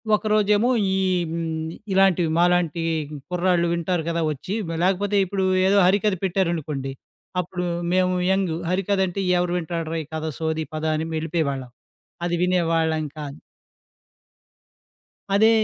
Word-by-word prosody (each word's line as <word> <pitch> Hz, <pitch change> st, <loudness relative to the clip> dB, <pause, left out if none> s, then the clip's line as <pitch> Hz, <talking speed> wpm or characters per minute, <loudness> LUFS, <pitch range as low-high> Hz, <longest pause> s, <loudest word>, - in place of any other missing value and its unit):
ఒకరోజేమో 210 Hz, +1 st, +2 dB, 0.3 s
ఈ -, -, +1 dB, 0.3 s
హ్మ్, 160 Hz, -1 st, -3 dB, 0.3 s
ఇలాంటివి 185 Hz, -4 st, +4 dB
మాలాంటి 175 Hz, -2 st, +2 dB, 0.5 s
కుర్రాళ్ళు 180 Hz, -1 st, +2 dB
వింటారు 170 Hz, -1 st, -1 dB
కదా 170 Hz, 0 st, 0 dB
వచ్చి. 150 Hz, +7 st, -5 dB, 0.3 s
లేకపోతే 200 Hz, +2 st, +1 dB
ఇప్పుడు 190 Hz, +1 st, -2 dB, 0.2 s
ఏదో 200 Hz, +1 st, +4 dB
హరికథ 205 Hz, +2 st, +3 dB
పెట్టారనుకోండి, 160 Hz, -7 st, -1 dB, 0.5 s
అప్పుడు 180 Hz, 0 st, -4 dB, 0.3 s
మేము 185 Hz, 0 st, +3 dB, 0.2 s
యంగు. 190 Hz, -4 st, +1 dB
హరికథ 195 Hz, +2 st, 0 dB
అంటే, 195 Hz, +2 st, -3 dB, 0.2 s
ఎవరు 175 Hz, 0 st, 0 dB
వింటాడ్రా 165 Hz, -1 st, -3 dB
ఈ -, -, -14 dB
కథ 160 Hz, 0 st, -2 dB
సోది, 160 Hz, -1 st, -1 dB
పద 155 Hz, -, -4 dB
అని 160 Hz, +1 st, -2 dB
వెళ్లిపోయేవాళ్ళం. 155 Hz, -5 st, -2 dB, 0.6 s
అది 175 Hz, 0 st, 0 dB
వినేవాళ్ళం 165 Hz, -3 st, +1 dB
కాదు. 145 Hz, -1 st, -6 dB, 2.0 s
అదే, 220 Hz, +2 st, +6 dB
175 Hz, 120 wpm, -23 LUFS, 160-190 Hz, 2.0 s, అదే